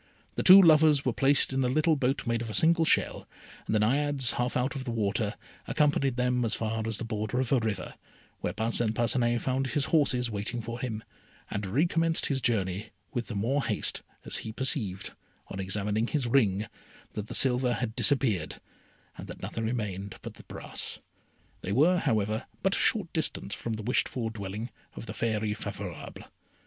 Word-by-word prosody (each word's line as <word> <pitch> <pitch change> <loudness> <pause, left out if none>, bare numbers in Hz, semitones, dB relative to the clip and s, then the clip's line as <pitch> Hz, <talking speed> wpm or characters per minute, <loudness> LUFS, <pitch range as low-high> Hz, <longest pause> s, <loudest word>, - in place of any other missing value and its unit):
The - - -2
two 190 +1 +10
lovers 155 -5 +6
were 125 - +1
placed 135 +1 +2
in 135 0 +1
a - - +2
little 155 +5 +3
boat 135 0 0
made 115 -1 0
of 115 - -5
a 105 - -1
single 165 0 +4
shell, - - +1 0.4
and - - 0
the - - +4
Naiades, 135 +3 +1
half 125 +1 -1
out 125 +3 -1
of 135 - -4
the 130 - -5
water, 110 -1 -1 0.3
accompanied 145 -4 +2
them 125 0 +1
as 115 -1 0
far 110 0 -2
as 110 -2 -3
the - - -5
border 110 +2 -2
of 130 -3 -1
a 135 - +4
river, 110 -5 -3 0.5
where - - -2
Parcin 110 +1 0
Parcinet 120 0 +1
found 135 +1 0
his 140 +1 0
horses 125 -6 +2
waiting 105 +3 -3
for 115 +1 -6
him, 115 -4 -4 0.5
and 100 0 -3
recommenced 165 - +1
his 135 -2 0
journey 100 -3 0 0.3
with 120 -3 -2
the 110 - -5
more 130 +8 0
haste, 110 -5 -1 0.2
as - - -2
he 110 - -5
perceived, 110 - -1 0.4
on 95 - -6
examining 105 +4 -1
his 145 -2 -1
ring, 110 -5 +2 0.5
that 105 0 -5
the - - -7
silver 125 -1 +4
had 115 -1 -3
disappeared, 115 - +2 0.6
and - - -7
that - - -10
nothing 115 - -3
remained 100 -4 -3
but - - -7
the - - -14
brass; - - -4 0.6
they 95 - -4
were, 160 - +4
however, 110 -1 0 0.2
but 195 +1 +2
a - - +1
short 195 -7 +2
distance 155 - -1
from 115 - -4
the 110 -1 -5
wished 125 +4 +1
for 115 -3 -3
dwelling 105 +2 -6 0.2
of - - -7
the - - -6
Fairy 110 -2 -1
Favourable. 110 - -7
120 Hz, 190 wpm, -28 LUFS, 110-135 Hz, 0.6 s, two